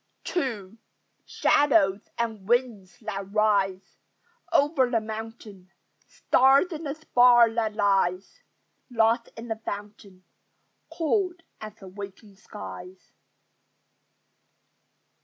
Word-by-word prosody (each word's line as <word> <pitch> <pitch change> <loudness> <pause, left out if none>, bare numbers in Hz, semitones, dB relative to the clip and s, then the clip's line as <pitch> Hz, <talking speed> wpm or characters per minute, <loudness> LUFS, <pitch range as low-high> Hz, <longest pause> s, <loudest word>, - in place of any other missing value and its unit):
II 225 - -3 0.5
Shadows 210 -9 +3 0.2
and 220 -4 -4
winds 235 -6 0
that 200 -3 -6
rise 200 -3 0 0.5
Over 280 -3 +3
the 235 -2 +1
mountain: 215 -3 -9 0.4
Stars 270 +7 +3
in 320 -1 -6
the 280 0 -3
spar 245 -6 +5
that 220 -2 -1
lies 195 -3 0 0.5
Lost 230 0 +1
in 230 +1 -8
the 225 -1 -3
fountain, 200 -3 -8 0.7
Cold 350 +1 -1 0.2
as 215 -1 -9
the 195 - -13
waking 200 +1 -10
skies. 190 -3 -11
220 Hz, 95 wpm, -26 LUFS, 195-245 Hz, 0.7 s, spar